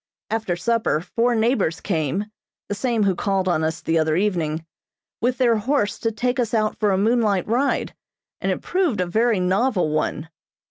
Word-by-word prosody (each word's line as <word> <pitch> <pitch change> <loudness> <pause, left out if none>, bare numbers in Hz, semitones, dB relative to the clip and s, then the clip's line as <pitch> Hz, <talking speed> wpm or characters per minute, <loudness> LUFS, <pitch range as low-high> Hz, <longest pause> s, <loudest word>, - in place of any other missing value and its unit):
After 220 -5 -1
supper 220 -2 +1
four 235 +8 0
neighbors 220 -7 +1
came 170 +1 -1 0.4
(the - - -1
same 225 +1 0
who 195 -1 +3
called 190 +1 -1
on 165 -3 +1
us 160 +1 -2
the 165 0 +1
other 155 0 +1
evening) 165 -5 -1 0.6
with 245 +2 +1
their 240 -3 +3
horse 215 -2 0
to 225 - 0
take 245 +4 -1
us 235 -1 0
out 215 -1 0
for 210 - +2
a 190 - +2
moonlight 215 -2 +2
ride, 250 +6 0 0.5
and - - -1
it - - -3
proved 360 - 0
a 180 - +2
very 220 +4 +2
novel 185 -1 +1
one. 155 +1 -2
210 Hz, 180 wpm, -22 LUFS, 175-235 Hz, 0.6 s, who